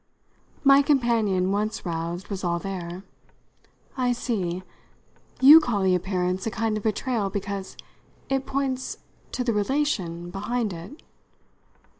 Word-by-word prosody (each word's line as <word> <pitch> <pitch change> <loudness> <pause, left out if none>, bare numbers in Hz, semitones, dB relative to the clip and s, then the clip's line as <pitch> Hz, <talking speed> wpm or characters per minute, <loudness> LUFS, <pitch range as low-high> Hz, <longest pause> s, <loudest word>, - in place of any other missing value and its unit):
My 275 0 +7
companion, 230 -9 +2
once 215 +2 -2
roused, 170 +2 -4
was 195 -2 -4
all 170 -1 +1
there. 180 -1 -6 0.9
"I 250 -2 +1
see. 185 -7 -2 0.8
You 290 +5 +11
call 230 -10 -1
the 190 -1 +3
appearance 180 +1 -1
a - - +1
kind 225 -1 -1
of 215 - -3
betrayal 220 0 -1
because 200 0 -5 0.5
it 270 0 -1
points 265 -1 -2 0.4
to 250 - -1
the 235 -2 0
relation 205 - -1
behind 210 +2 -2
it." 175 - -10
205 Hz, 125 wpm, -25 LUFS, 185-245 Hz, 0.9 s, You